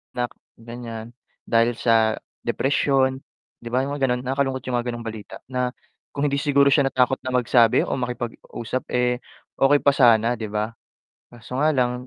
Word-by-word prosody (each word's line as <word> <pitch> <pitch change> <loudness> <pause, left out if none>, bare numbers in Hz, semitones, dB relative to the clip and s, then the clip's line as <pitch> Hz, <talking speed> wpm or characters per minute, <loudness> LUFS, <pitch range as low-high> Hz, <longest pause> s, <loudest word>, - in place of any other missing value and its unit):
Nak 120 -1 -2 0.3
ganyan. 115 0 -8 0.3
Dahil 115 +1 +3
sa, 110 -1 +3 0.3
depresyon, 130 +1 +1 0.4
'di 120 - -7
ba 130 +2 +1
yung 140 +1 -3
ganon 125 -1 0
nakakalungkot 135 -1 -1
yung 125 - -2
mga 125 - -8
ganong 120 -1 -6
balita, 110 -2 -7
na 125 -1 -1 0.4
kung 140 0 -2
hindi 140 -1 0
siguro 140 -1 +4
siya 140 -2 +3
natakot 130 0 +1
na 130 - -5
magsabi 120 -2 +4
o - - -3
makipag-usap 120 0 -4
eh, 125 0 0 0.4
okey 145 +2 +5
pa 140 - +6
sana 120 -3 +4
'di 110 -3 -5
ba? 105 +2 -2 0.6
Kaso 120 +2 -8
nga 155 +1 +3
lang 125 0 0
125 Hz, 165 wpm, -23 LUFS, 115-135 Hz, 0.6 s, pa